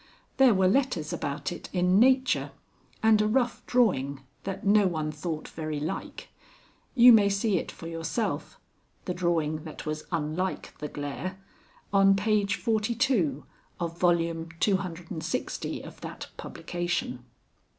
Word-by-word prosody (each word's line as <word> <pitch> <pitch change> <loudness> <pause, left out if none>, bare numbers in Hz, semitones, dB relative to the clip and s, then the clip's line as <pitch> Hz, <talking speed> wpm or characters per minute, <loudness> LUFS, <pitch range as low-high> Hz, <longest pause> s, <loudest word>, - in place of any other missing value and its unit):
There 265 -5 +6
were 190 0 +4
letters 195 - +1
about 140 +1 -3
it 175 - -7
in 180 +1 +3
Nature, 260 +2 +3 0.5
and 220 -1 +5
a 210 - +2
rough 245 +2 0
drawing 140 - +2 0.2
that 195 +1 -4
no 205 0 +5
one 155 -3 -2
thought 155 +1 -5
very 155 -2 -4
like. 150 +2 -5 0.7
(You 245 -1 +9
may 205 -2 +6
see 200 -1 +1
it - - -6
for - - -11
yourself 165 +7 -3 0.5
the 180 - -2
drawing 165 -3 0
that 155 -1 -8
was 155 0 -4
unlike 165 +3 -2
the 150 - -3
glare 145 +7 -5 0.6
on 195 0 +6
page 205 0 +1
42 220 - 0 0.3
of 170 -1 -3
Vol. 175 -1 +5
cclx. 165 +3 -2
of - - -12
that - - -7
publication.) 175 -8 -3
180 Hz, 130 wpm, -28 LUFS, 160-215 Hz, 0.7 s, You